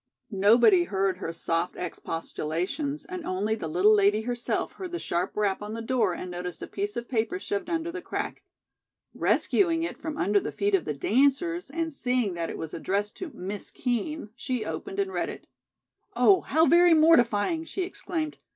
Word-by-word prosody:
Nobody 240 Hz, -, +5 dB
heard 195 Hz, -, 0 dB
her 165 Hz, -, -4 dB
soft 165 Hz, +1 st, -1 dB
expostulations, 180 Hz, -, -3 dB
and 365 Hz, -2 st, -6 dB
only 205 Hz, -2 st, -1 dB
the 215 Hz, -7 st, -4 dB
little 180 Hz, +7 st, +4 dB
lady 205 Hz, +1 st, +4 dB
herself 240 Hz, +1 st, -2 dB
heard 365 Hz, -2 st, -7 dB
the 345 Hz, -, -2 dB
sharp 175 Hz, -, -2 dB
rap 205 Hz, -2 st, +1 dB
on 210 Hz, +1 st, -5 dB
the 230 Hz, -, -4 dB
door 230 Hz, -7 st, +1 dB
and 180 Hz, -, -6 dB
noticed 180 Hz, 0 st, -5 dB
a -, -, -5 dB
piece 405 Hz, +1 st, -4 dB
of 235 Hz, 0 st, -4 dB
paper 225 Hz, -6 st, 0 dB
shoved 200 Hz, -, -3 dB
under 335 Hz, 0 st, -1 dB
the 365 Hz, 0 st, -6 dB
crack. -, -, -4 dB, 0.7 s
Rescuing 335 Hz, -4 st, +2 dB
it 335 Hz, -, -4 dB
from 315 Hz, -2 st, -5 dB
under 205 Hz, +2 st, +3 dB
the -, -, -4 dB
feet 405 Hz, 0 st, -1 dB
of 390 Hz, -, +3 dB
the 150 Hz, -, -2 dB
dancers, 280 Hz, -, +1 dB
and 325 Hz, +2 st, -3 dB
seeing 250 Hz, -7 st, 0 dB
that 170 Hz, -1 st, -3 dB
it -, -, -5 dB
was 160 Hz, -1 st, -6 dB
addressed 200 Hz, +4 st, -2 dB
to 370 Hz, -, -5 dB
"Miss 195 Hz, +2 st, -5 dB
Kean," 245 Hz, +1 st, -2 dB
she 255 Hz, -4 st, -3 dB
opened 390 Hz, -, -5 dB
and 390 Hz, -1 st, -1 dB
read -, -, -1 dB
it. -, -, -9 dB, 0.7 s
"Oh, 390 Hz, -2 st, +5 dB
how 320 Hz, +3 st, +3 dB
very 345 Hz, 0 st, +6 dB
mortifying," 310 Hz, -, +4 dB
she 375 Hz, +3 st, -3 dB
exclaimed. 335 Hz, -4 st, -4 dB
240 Hz, 185 wpm, -27 LUFS, -, 0.7 s, very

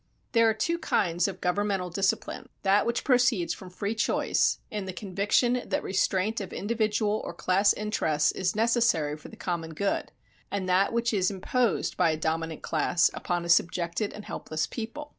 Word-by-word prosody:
There 230 Hz, -1 st, +5 dB
are -, -, +2 dB
two 335 Hz, +10 st, -1 dB
kinds 175 Hz, -, +1 dB
of 190 Hz, -1 st, -6 dB
governmental 190 Hz, 0 st, 0 dB
discipline: 195 Hz, +5 st, -1 dB
that 200 Hz, +2 st, +3 dB
which 235 Hz, 0 st, 0 dB
proceeds 245 Hz, -8 st, +3 dB
from 185 Hz, -, -10 dB
free 200 Hz, +4 st, -3 dB
choice, 225 Hz, -, +1 dB
in 210 Hz, -2 st, -3 dB
the 185 Hz, -, -5 dB
conviction 210 Hz, +6 st, +1 dB
that -, -, -2 dB
restraint 195 Hz, +3 st, 0 dB
of 190 Hz, -, -6 dB
individual 215 Hz, 0 st, 0 dB
or -, -, -6 dB
class 195 Hz, +2 st, +3 dB
interests 185 Hz, -8 st, +1 dB
is 185 Hz, 0 st, -1 dB
necessary 225 Hz, -10 st, +2 dB
for 150 Hz, -, -12 dB
the -, -, -12 dB
common 165 Hz, -3 st, -4 dB
good; 200 Hz, +4 st, -1 dB, 0.4 s
and 195 Hz, -2 st, -3 dB
that 185 Hz, +2 st, +3 dB
which 235 Hz, 0 st, 0 dB
is 185 Hz, -3 st, +2 dB
imposed 205 Hz, +3 st, 0 dB
by -, -, +4 dB
a 155 Hz, -, 0 dB
dominant 160 Hz, 0 st, -2 dB
class, 165 Hz, +2 st, +2 dB
upon 175 Hz, -1 st, -2 dB
a -, -, -5 dB
subjected 170 Hz, +4 st, +1 dB
and 210 Hz, -, -10 dB
helpless 155 Hz, 0 st, -3 dB
people. 255 Hz, +6 st, -6 dB
195 Hz, 175 wpm, -27 LUFS, 175-220 Hz, 0.4 s, There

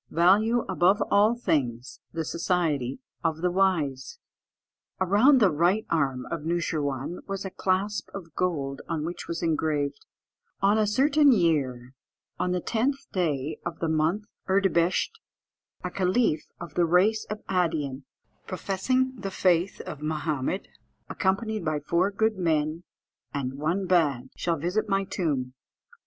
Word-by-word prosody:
"Value 210 Hz, +8 st, +4 dB
above 190 Hz, +2 st, +3 dB
all 210 Hz, +3 st, +5 dB
things 130 Hz, -, -1 dB
the 165 Hz, -1 st, -3 dB
society 160 Hz, -7 st, 0 dB, 0.3 s
of 160 Hz, -1 st, -1 dB
the 180 Hz, -, +2 dB
wise." 160 Hz, -9 st, 0 dB, 0.8 s
Around 205 Hz, +10 st, +5 dB
the 200 Hz, -6 st, +5 dB
right 175 Hz, +8 st, +2 dB
arm 135 Hz, -6 st, 0 dB
of 170 Hz, -, -2 dB
Noosheerwân 155 Hz, -2 st, -2 dB
was 195 Hz, -1 st, -4 dB
a 190 Hz, -, -4 dB
clasp 195 Hz, +3 st, -1 dB
of 170 Hz, -5 st, -9 dB
gold, 140 Hz, -7 st, -2 dB
on 160 Hz, -2 st, -2 dB
which 175 Hz, +2 st, -6 dB
was 170 Hz, 0 st, -4 dB
engraved 150 Hz, -3 st, 0 dB, 0.6 s
"On 200 Hz, +2 st, +3 dB
a 215 Hz, -, +2 dB
certain 285 Hz, +6 st, +4 dB
year, 135 Hz, -, +1 dB, 0.5 s
on 180 Hz, -, 0 dB
the 180 Hz, 0 st, 0 dB
10th 260 Hz, +8 st, -1 dB
day 155 Hz, -5 st, -1 dB
of 170 Hz, -1 st, -4 dB
the 165 Hz, -, -2 dB
month 160 Hz, +6 st, +1 dB, 0.2 s
Erdebehisht, 190 Hz, -, +2 dB, 0.6 s
a -, -, -3 dB
caliph 185 Hz, -2 st, +1 dB
of 170 Hz, -3 st, -8 dB
the 175 Hz, -, +3 dB
race 190 Hz, +6 st, +3 dB
of 215 Hz, 0 st, -5 dB
Adean, 160 Hz, -7 st, -1 dB, 0.4 s
professing 230 Hz, +8 st, 0 dB
the 200 Hz, -4 st, -5 dB
faith 180 Hz, -1 st, +1 dB
of 150 Hz, -, -8 dB
Mahomed, 155 Hz, +2 st, -2 dB, 0.4 s
accompanied 215 Hz, +2 st, 0 dB
by 155 Hz, -2 st, 0 dB
four 170 Hz, +6 st, +1 dB
good 215 Hz, +1 st, 0 dB
men, 160 Hz, 0 st, 0 dB, 0.5 s
and 135 Hz, -1 st, -3 dB
one 170 Hz, +6 st, 0 dB
bad, 145 Hz, -9 st, +1 dB
shall 170 Hz, -1 st, -1 dB
visit 195 Hz, +7 st, -1 dB
my 195 Hz, -1 st, +2 dB
tomb." 145 Hz, -9 st, -2 dB
175 Hz, 140 wpm, -27 LUFS, 150-195 Hz, 0.8 s, all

